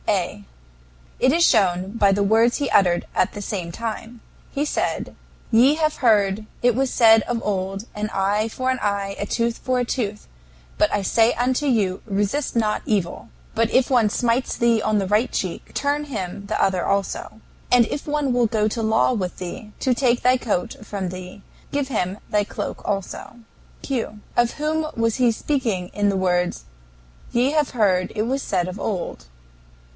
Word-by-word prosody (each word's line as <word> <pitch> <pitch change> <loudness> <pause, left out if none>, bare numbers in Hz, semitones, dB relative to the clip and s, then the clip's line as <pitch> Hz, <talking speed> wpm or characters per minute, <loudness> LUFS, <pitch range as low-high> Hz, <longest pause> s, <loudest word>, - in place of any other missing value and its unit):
A. - - -1 0.8
It 260 - +4
is 335 +3 +4
shown 190 - +2
by 205 -3 +3
the 200 +1 +2
words 225 +4 +3
he 285 -2 -1
uttered 175 -3 +3
at - - +1
the 205 - -6
same 185 -5 -4
time. 230 +3 -6 0.3
He 285 +2 -1
said: - - -2 0.4
"Ye 250 +6 +5
have 310 -1 0
heard, 215 -3 +2 0.2
it 245 0 +5
was 265 0 0
said 225 -2 +6
of 235 -1 -2
old, 195 0 -2
An 210 0 -3
eye 205 +3 +1
for 255 +3 -1
an 255 - -2
eye, 200 -1 -1
and 205 - -2
a - - -13
tooth 235 -1 0
for 255 -1 0
a 245 - 0
tooth. 210 -4 -3 0.5
But - - +3
I 205 - +1
say 225 +4 +3
unto 255 +4 0
you 205 -8 +1
Resist 205 +9 -1
not 215 -2 +1
evil. 195 -6 -1 0.2
But 230 0 +1
if 255 -1 +3
one 235 -5 +4
smites 240 +3 0
thee 235 -2 +3
on 215 0 +1
the 195 -2 0
right 210 +5 +2
cheek, 185 -3 -4
turn 290 +1 0
him 200 -6 -5
the 215 - -1
other 190 -2 +2
also; 200 +2 -2 0.3
and 245 -1 +6
if 290 - -5
one 295 -3 0
will 245 -1 +3
go 215 -1 +1
to 225 +2 -2
law 220 +3 +2
with 185 -6 -3
thee 185 +4 -7
to 260 - +2
take 245 -1 +1
thy 255 +1 +5
coat 215 -8 -2
from 195 -3 -4
thee, 185 +2 -9 0.3
give 285 -1 -1
him 195 -6 -1
thy 210 -1 +2
cloak - - -5
also." 195 +3 -4 0.5
Q. 230 -5 -3 0.2
Of 240 0 +2
whom 310 +1 -1
was 230 -1 +1
he 245 -2 +4
speaking 225 -8 -1
in 205 0 +1
the 195 - 0
words, 180 - 0 0.7
"Ye 245 +3 +2
have 300 -2 +1
heard 190 -6 +1
it 215 - 0
was 265 +4 -1
said 180 -7 -1
of 185 +2 -6
old"? 175 - -4
220 Hz, 185 wpm, -22 LUFS, 195-245 Hz, 0.8 s, said